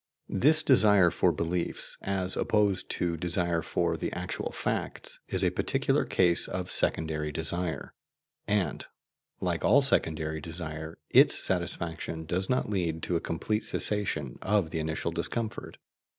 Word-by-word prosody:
This 155 +10 +4
desire 105 -9 +5
for - - +2
beliefs, 85 +1 -3
as 95 -1 -1
opposed 105 -3 +1
to 85 -1 -1
desire 85 0 0
for 85 0 -1
the 80 - -3
actual - - -4
facts, - - -4
is - - +2
a - - +3
particular - - +1
case 90 -2 +2
of 90 -1 -4
secondary 75 -1 -1
desire, 85 +3 -3 0.5
and, 100 -8 0 0.6
like 90 -2 -1
all 140 +1 +5
secondary 80 - 0
desire 80 0 -7
its - - +6
satisfaction 80 -1 -1
does 95 +3 -1
not 125 - +1
lead 85 -6 -2
to 90 - -1
a - - +2
complete 105 +6 -2
cessation 100 - 0
of 95 -5 +1
the 80 - -2
initial 80 +1 -2
discomfort. 105 +7 -4
85 Hz, 135 wpm, -29 LUFS, 80-100 Hz, 0.6 s, its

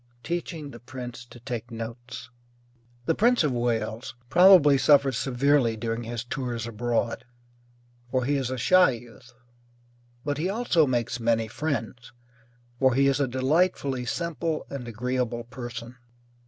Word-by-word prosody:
TEACHING 170 -4 -4
THE 120 - -11
PRINCE 125 -1 -8
TO 120 - -14
TAKE 120 -2 -5
NOTES 115 +1 -8 0.7
The 165 - +2
Prince 235 +3 +3
of 150 - +1
Wales 120 0 -2
probably 175 -3 +7
suffers 140 -2 +4
severely 130 -2 +2
during 115 +1 -3
his 115 -1 -4
tours 120 -2 -4
abroad, 115 0 -2 0.9
for 130 0 0
he 145 +2 +1
is 135 -3 -1
a 130 - -3
shy 185 +8 +5
youth; 115 -2 -13 0.9
but 145 -1 -1
he 175 +4 0
also 195 -8 +2
makes 120 -1 -1
many 115 -1 +1
friends, 125 -2 -4 0.7
for 130 -2 +3
he 140 +1 +4
is 140 0 +2
a 140 - +2
delightfully 135 0 +1
simple 165 +3 -2
and 130 -4 -6
agreeable 120 +1 -2
person. 120 0 -8
125 Hz, 140 wpm, -26 LUFS, 120-145 Hz, 0.9 s, probably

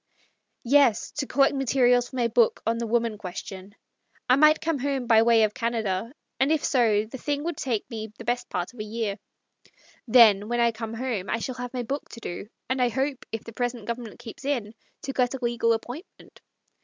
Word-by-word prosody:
" - - -51 0.2
Yes, 250 -3 +3
to 275 -2 -1
collect 275 +1 +3
materials 250 -2 +2
for - - -11
my 240 -2 +2
book 235 0 +2
on 230 +1 0
the 235 - -2
Woman 230 -2 0
Question. 190 +1 -8 0.5
I 255 - +6
might 305 +2 +5
come 320 -2 -1
home 270 -1 -1
by 230 -2 +5
the - - +5
way 230 -1 +5
of 210 -1 +1
Canada, 225 -2 -2 0.3
and 265 +4 +3
if 315 -2 +1
so, 220 -5 +3
the 245 +4 -9
thing 290 +2 -2
would 340 0 -2
take 235 -6 -2
me 220 -2 -6
the - - -9
best 245 0 -1
part 180 +5 -3
of 245 - -16
a - - -2
year. 215 -1 -3 0.9
Then, 215 -3 +6
when 240 0 0
I 235 0 +4
come 225 0 -6
home, 225 -6 -3
I - - +1
shall 255 +3 -4
have 245 0 -6
my 250 - -2
book 275 +5 -4
to 230 - -8
do; 195 0 -6 0.2
and 260 0 0
I 245 - +3
hope, 265 +2 -2
if 225 - -4
the 230 - -10
present 245 -2 -3
Gov 235 - -1
ernment 230 -4 -9
keeps 240 +2 -11
in, 245 -7 -2 0.3
to 270 - -4
get 250 0 +1
a - - -6
legal 235 -1 +1
appointment. 245 - -6
235 Hz, 220 wpm, -26 LUFS, 220-260 Hz, 0.9 s, I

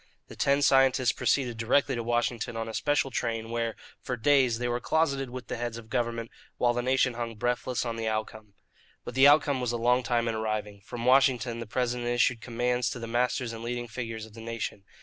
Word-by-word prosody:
The - - -10
ten 140 +1 +2
scientists 135 -3 +4
proceeded 125 -5 0
directly 130 +5 +2
to 120 - -2
Washington 120 0 -1
on 115 0 -3
a 110 - -6
special 140 -1 +1
train, 115 -2 -2
where, 115 -1 -1 0.3
for 125 - -3
days, 130 -2 +3
they 120 +1 -2
were 120 0 -1
closeted 140 -2 0
with 125 0 -7
the - - -5
heads 120 -1 -4
of 115 -1 -12
government, 115 -2 -2 0.3
while 120 -1 +2
the 120 - -1
nation 130 0 +2
hung 115 -1 -4
breathless 120 +2 -1
on 115 -1 -3
the 115 -1 -2
outcome. 110 -1 -4 0.5
But - - -6
the 135 +2 +7
outcome 145 -2 +4
was 125 -2 -1
a - - 0
long 125 +2 +3
time 120 -1 0
in 115 - 0
arriving. 110 -2 -3
From 120 +3 -6
Washington 125 -3 +3
the 115 - -6
President 120 +1 -1
issued 120 -1 +2
commands 125 0 0
to - - -5
the 115 - -6
masters 120 +1 0
and 115 - -7
leading 120 0 -3
figures 115 -1 -5
of 110 - -16
the 115 - -10
nation. 115 -3 -5
120 Hz, 215 wpm, -28 LUFS, 115-125 Hz, 0.5 s, the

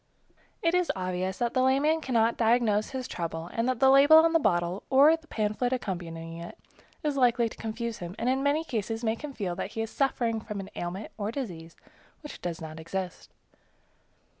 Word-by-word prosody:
It 335 0 +3
is 360 -1 +2
obvious 185 0 -2
that 240 -1 -1
the 255 - +2
layman 280 +5 +3
cannot 235 -4 +2
diagnose 225 -2 +2
his 260 -1 -4
trouble, 165 0 -5
and 230 +2 0
the 255 +1 +3
label 285 +3 +8
on 325 +1 +5
the 330 - +5
bottle, 175 - 0
or 280 +4 +6
the 325 -1 -16
pamphlet 215 +1 -1
accompanying 165 -8 -4
it, 170 - -9 0.5
is 295 -2 -1
likely 240 -2 +3
to - - -10
confuse 225 +1 -4
him, 175 +1 -7
and 240 - -2
in 260 +1 +2
many 285 +3 +1
cases 225 -4 -3
makes 225 +4 -1
him 295 -2 -5
feel 190 -8 -3
that 190 - -4
he 225 - -2
is 225 - -6
suffering 235 -5 0
from 210 -2 -6
an 195 - -8
ailment 180 +4 -5
or 205 0 -1
disease 175 - -6 0.5
which 295 - -9
does 170 -2 -4
not 160 0 -8
exist. 185 +3 -5
225 Hz, 190 wpm, -28 LUFS, 185-265 Hz, 0.5 s, label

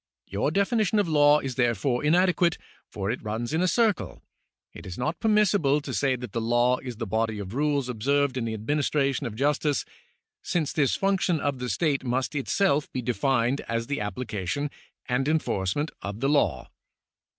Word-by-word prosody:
Your 100 +8 -1
definition 210 +4 +1
of 205 -3 +2
law 150 -1 +5
is 135 -2 -4
therefore 120 +1 0
inadequate, 175 +1 +3 0.3
for 100 0 -3
it 120 - -4
runs 115 +5 -3
in 160 - +1
a 185 - +2
circle. 220 0 0 0.5
It - - -10
is 90 - -7
not 155 +7 -2
permissible 205 -9 +3
to 145 - -6
say 135 -2 +1
that 125 -3 -7
the 115 - -2
law 120 +2 +2
is 125 -2 -7
the 115 +1 -4
body 110 +1 -1
of 100 0 -6
rules 145 -1 0
observed 135 +3 +1
in 125 -3 -2
the 110 -1 -3
administration 140 +3 0
of 110 - -7
justice, 145 +3 +1 0.6
since 160 -5 -1
this 140 -4 +2
function 195 -4 +1
of 140 -2 -2
the 125 0 -3
state 145 -3 0
must 130 +1 -1
itself 150 +2 +1
be 130 - -3
defined 125 +3 +1
as 115 0 -1
the 145 0 -3
application 105 +4 -3 0.4
and 130 +2 0
enforcement 145 - 0
of 100 +3 -5
the 135 +2 +1
law." 100 - +1
135 Hz, 175 wpm, -26 LUFS, 115-150 Hz, 0.6 s, law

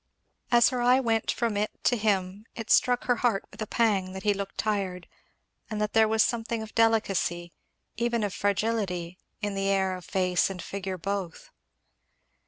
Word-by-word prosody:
As 240 -1 +6
her 250 -1 -2
eye 250 +2 +5
went 225 -4 0
from 230 -3 0
it 210 +1 0
to 245 - +3
him 205 -1 -1
it 225 -1 -5
struck 245 0 +4
her 245 -1 +1
heart 230 -6 +1
with - - -12
a 215 - -2
pang 200 -6 +1
that 190 0 -7
he 210 - +3
looked 200 0 -6
tired 195 -4 -2 0.6
and 215 -2 -3
that 210 0 -1
there 220 -1 +5
was 220 0 +3
a - - +3
something 230 -1 -3
of 220 - -11
delicacy, 195 -7 +1 0.4
even 235 -1 0
of 205 -3 -2
fragility, 195 -4 -1 0.2
in 205 -1 -1
the 195 0 -1
air 190 -1 +1
of 180 - -9
face 180 -1 +1
and 190 -2 -6
figure 190 0 -5
both. 195 -1 -4
205 Hz, 185 wpm, -27 LUFS, 190-225 Hz, 0.6 s, As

